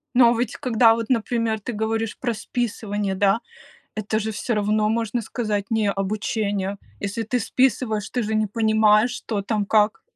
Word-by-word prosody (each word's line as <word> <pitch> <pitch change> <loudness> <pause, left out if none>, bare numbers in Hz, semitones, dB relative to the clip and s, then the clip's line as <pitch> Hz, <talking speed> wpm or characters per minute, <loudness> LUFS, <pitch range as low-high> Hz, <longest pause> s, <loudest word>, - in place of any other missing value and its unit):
Но, 240 -1 +7
а, 235 - 0
ведь 240 -1 -1
когда 235 -3 +4
вот, 225 -1 -4
например, 230 -2 0
ты 240 - -5
говоришь 220 0 -2
про 240 -3 -1
списывание, 210 -3 -2
да, 195 +3 +2 0.6
это 215 0 -1
же 220 0 -2
всё 220 +3 -2
равно 210 +1 +1
можно 230 +1 -1
сказать- 210 -3 -2
не 220 -2 +2
обучение. 200 0 -2 0.2
Если 200 +3 -3
ты 245 +3 -1
списываешь, 225 -3 0
ты 245 - -1
же 215 +1 -1
не 215 0 +1
понимаешь, 220 +1 +3
что 220 -4 -3
там 205 0 -1
как. 210 +1 +2
220 Hz, 170 wpm, -23 LUFS, 210-230 Hz, 0.6 s, Но